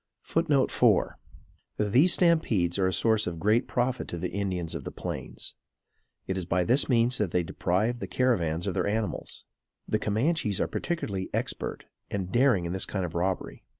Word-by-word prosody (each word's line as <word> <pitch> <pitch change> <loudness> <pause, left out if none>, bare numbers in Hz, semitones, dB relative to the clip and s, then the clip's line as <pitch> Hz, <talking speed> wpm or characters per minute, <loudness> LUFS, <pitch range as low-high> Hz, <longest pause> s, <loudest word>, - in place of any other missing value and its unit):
[Footnote 150 -5 +1
4: - - +2 0.6
These 125 - +4
stampedes 115 - +2
are 95 - +3
a - - +1
source 110 +4 +3
of 85 -2 -4
great 110 +7 +2
profit 125 -1 -1
to 85 - -5
the 90 +1 -3
Indians 95 -4 -2
of - - -5
the - - -5
Plains. - - -6 0.7
It 95 - -2
is 90 - -4
by 90 0 +2
this 125 +11 +2
means 120 0 +3
they 90 -4 +1
deprive 105 +8 0
the - - -5
caravans 85 -11 +1
of 100 - -1
their - - 0
animals. 110 +1 -3 0.4
The 110 - 0
Camanches 110 - 0
are - - +2
particularly 100 - -3
expert - - -3 0.2
and 95 -2 -3
daring 120 -8 +3
in 85 - -3
this 95 - -2
kind 95 -3 -2
of 85 - -6
robbery. 90 +2 -2
105 Hz, 175 wpm, -28 LUFS, 90-125 Hz, 0.7 s, These